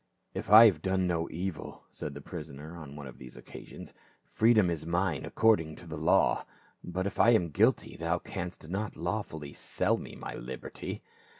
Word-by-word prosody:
" - - -47
If - - -5
I 110 +3 +11
have 95 -9 +4
done 95 0 +1
no 85 -2 0
evil," 90 -1 -5
said 70 -2 -6
the 70 - -7
prisoner 80 -1 -8
on 75 -4 -9
one 75 -1 -8
of 65 -2 -11
these 65 -1 -11
occasions, - - -11 0.3
"freedom 110 -5 +4
is 80 -3 -3
mine 85 +3 0
according 95 -9 +2
to 90 - -11
the 80 -2 -6
law; 75 +1 +3 0.4
but 90 +2 -3
if 100 - -4
I 115 - +7
am 85 -5 -2
guilty, 75 - +2
thou 85 +2 0
canst 90 -3 -6
not 100 +4 -3
lawfully 80 -5 -4
sell - - 0
me - - -9
my - - -6
liberty." 65 +1 -6
85 Hz, 185 wpm, -30 LUFS, 75-95 Hz, 0.4 s, I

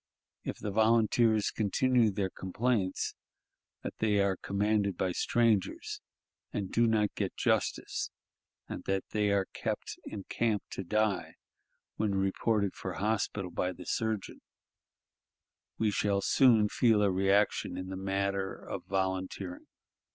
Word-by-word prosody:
If - - -4
the 105 - -4
volunteers 110 0 +3
continue 115 +3 +2
their 95 -1 -2
complaints 95 0 -1 0.7
that - - -4
they 105 -2 +2
are 100 -1 +2
commanded 100 -1 0
by 95 - 0
strangers 115 0 +1 0.5
and 100 -2 -3
do 115 0 +3
not 105 -2 +2
get - - -3
justice, - - 0 0.6
and - - -6
that 95 0 0
they 105 -1 +1
are 100 -1 +2
kept - - -4
in 100 - -6
camp 110 -1 0
to 95 - -4
die 105 0 0 0.6
when 105 -2 0
reported 100 +1 +1
for 95 - -5
hospital 100 -1 -1
by 90 +1 -1
the 90 0 -11
surgeon, 110 -3 -2 1.4
we 110 -2 +2
shall 100 -1 +1
soon 115 -2 +5
feel 110 -1 +3
a 100 - +3
reaction 95 +2 +2
in 95 0 -5
the 95 - -4
matter 95 0 -1
of - - -7
volunteering. 95 -1 -2
100 Hz, 130 wpm, -31 LUFS, 95-110 Hz, 1.4 s, soon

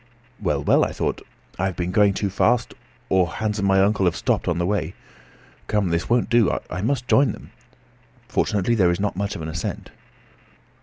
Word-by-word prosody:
Well, - - 0
well, - - +4
I - - -2
thought; - - -2 0.4
I 95 - +1
have 95 -2 -2
been 90 +1 -2
going 100 0 +3
too 100 -2 -2
fast, 115 +4 +1 0.3
or 95 -2 +3
Hans 105 +4 -3
and 100 - +1
my 95 0 +4
uncle 100 -1 +2
have 90 - +2
stopped - - -1
on 85 - 0
the 85 - 0
way. 90 -3 -2 0.7
Come, 105 -4 0
this 85 0 -1
won't 120 0 +2
do; 120 -2 +3
I 90 - -3
must 125 +3 -1
join 140 0 +4
them. - - -13 0.8
Fortunately 105 +3 0
there 95 -6 +3
is 85 +1 0
not 100 -1 -1
much 100 +2 -3
of 80 - -6
an - - -4
ascent. 80 +2 -5
100 Hz, 200 wpm, -22 LUFS, 90-105 Hz, 0.8 s, well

